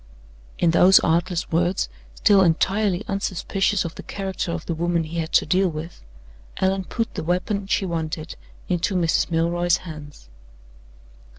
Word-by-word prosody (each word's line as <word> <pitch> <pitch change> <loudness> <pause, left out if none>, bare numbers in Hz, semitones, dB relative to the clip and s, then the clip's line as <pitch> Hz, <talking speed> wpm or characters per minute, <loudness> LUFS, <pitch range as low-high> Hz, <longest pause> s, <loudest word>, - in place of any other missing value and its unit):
In 170 - +3
those 185 +3 +7
artless 170 +1 0
words, 175 - +1 0.3
still 200 -2 +4
entirely 190 +3 +1
unsuspicious 195 0 -1
of 165 - -5
the - - -9
character 190 -3 -4
of 170 -2 -5
the 170 - -2
woman 170 +1 0
he 165 +2 -5
had 160 -1 -3
to - - +4
deal 185 0 +2
with, 160 +1 -7 0.6
Allan 190 0 0
put 230 +4 -3
the - - -4
weapon 190 +4 -1
she 195 - +1
wanted 160 -2 -4 0.3
into 180 +2 0
Mrs. 170 -2 +1
Milroy's 170 +1 +1
hands. 150 - -10
175 Hz, 150 wpm, -23 LUFS, 165-190 Hz, 0.6 s, those